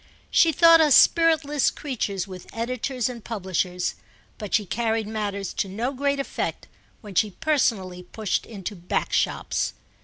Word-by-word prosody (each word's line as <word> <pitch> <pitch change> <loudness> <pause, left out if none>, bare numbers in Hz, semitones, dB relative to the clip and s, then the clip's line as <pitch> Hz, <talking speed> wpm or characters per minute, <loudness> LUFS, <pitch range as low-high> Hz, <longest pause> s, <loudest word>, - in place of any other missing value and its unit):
She 330 - +5
thought 330 +2 +7
us 300 -4 +5
spiritless 315 -4 +4
creatures 210 - -3
with 185 -2 -10
editors 250 +1 -2
and 240 -3 -7
publishers; 185 -4 -2 0.5
but 210 -2 -6
she 210 - +2
carried 225 +1 -1
matters 205 -3 -3
to 195 - -2
no 230 +7 -2
great 280 +1 0
effect 275 - -4 0.3
when 210 -4 -10
she 210 +4 +2
personally 205 - 0
pushed 205 +2 -3
into 205 -2 -6
back 175 0 -3
shops. - - 0
220 Hz, 145 wpm, -24 LUFS, 195-275 Hz, 0.5 s, thought